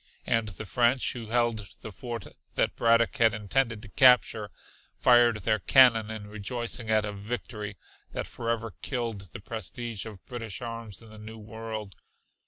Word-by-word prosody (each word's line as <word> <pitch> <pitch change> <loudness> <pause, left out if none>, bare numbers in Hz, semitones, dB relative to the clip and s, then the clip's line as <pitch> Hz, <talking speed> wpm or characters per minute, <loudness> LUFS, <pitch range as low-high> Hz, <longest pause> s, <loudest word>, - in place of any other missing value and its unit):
And 115 -1 +1
the 105 +2 -7
French, 120 +5 +2
who 115 -3 -7
held 115 -3 +1 0.2
the 110 - -6
fort 120 +4 -6 0.3
that - - +1
Braddock 115 0 +3
had 115 -1 +4
intended 110 +2 0
to - - -9
capture, 125 -4 +5 0.5
fired 120 -2 +5
their 110 +2 +1
cannon 115 -1 +6
in 110 -2 -6
rejoicing 110 +3 -3
at 110 -1 +3
a 105 - -3
victory 105 -1 -5 0.3
that - - -3
forever 115 -2 -3
killed 115 - -4
the - - -8
prestige 110 +1 -4
of 105 -4 -11
British 115 -5 -6
arms 115 -3 -5
in 115 - -14
the 110 - -12
New 110 +1 -9
World. 110 -1 -7
110 Hz, 160 wpm, -28 LUFS, 105-120 Hz, 0.5 s, cannon